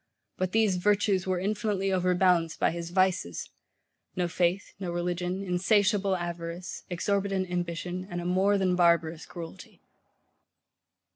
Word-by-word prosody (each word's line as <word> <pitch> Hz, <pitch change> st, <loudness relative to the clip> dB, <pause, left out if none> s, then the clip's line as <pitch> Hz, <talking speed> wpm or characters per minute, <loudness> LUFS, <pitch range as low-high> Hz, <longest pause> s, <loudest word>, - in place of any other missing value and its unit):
But 185 Hz, -1 st, 0 dB
these 215 Hz, -4 st, +3 dB
VIRTUES 200 Hz, 0 st, +2 dB
were 185 Hz, -1 st, +1 dB
infinitely 205 Hz, 0 st, -1 dB
overbalanced 180 Hz, -2 st, +2 dB
by -, -, +3 dB
his 170 Hz, 0 st, -5 dB
VICES; 180 Hz, -, 0 dB, 0.7 s
no 180 Hz, -1 st, 0 dB
faith, 175 Hz, +3 st, 0 dB
no 185 Hz, -3 st, -4 dB
religion, 180 Hz, +2 st, -2 dB
insatiable 195 Hz, +1 st, +2 dB
avarice, 175 Hz, 0 st, -5 dB
exorbitant 190 Hz, +1 st, -1 dB
ambition, 175 Hz, +1 st, -3 dB
and 175 Hz, -, -4 dB
a 175 Hz, -, -5 dB
more 190 Hz, +3 st, +3 dB
than 185 Hz, -2 st, +2 dB
barbarous 170 Hz, -2 st, +2 dB
cruelty. 170 Hz, -2 st, -10 dB
180 Hz, 125 wpm, -28 LUFS, 175-195 Hz, 0.7 s, these